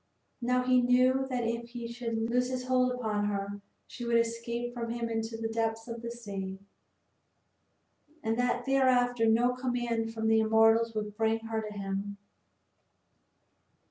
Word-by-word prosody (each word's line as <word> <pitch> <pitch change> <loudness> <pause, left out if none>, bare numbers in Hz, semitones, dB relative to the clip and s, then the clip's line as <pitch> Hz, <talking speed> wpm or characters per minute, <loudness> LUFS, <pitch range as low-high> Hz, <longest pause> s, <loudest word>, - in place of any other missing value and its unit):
Now 250 +1 +2
he 255 0 +4
knew 255 +2 +3
that 250 -2 -1
if 235 +1 -2
he 235 -1 -6
should 235 -1 -4
loose 250 +1 +1
his 255 -1 -3
hold 255 0 +2
upon 215 -4 -1
her 200 0 -3 0.2
she 240 - -9
would 235 0 +2
escape 235 +1 -2
from 235 -1 -4
him 235 0 -2
into 225 0 -3
the 225 0 -2
depths 225 0 -2
of 230 -1 -6
the 235 - -5
sea, 200 -5 -6 1.7
and 225 0 +1
that 245 0 +1
thereafter 250 -3 +3
no 240 +3 +4
command 240 -3 -1
from 220 -1 -2
the 220 0 +5
immortals 225 +1 +4
would 210 -1 -3
bring 225 +1 +1
her 225 0 -3
to 215 -1 -6
him. 200 0 -4
230 Hz, 155 wpm, -30 LUFS, 225-245 Hz, 1.7 s, the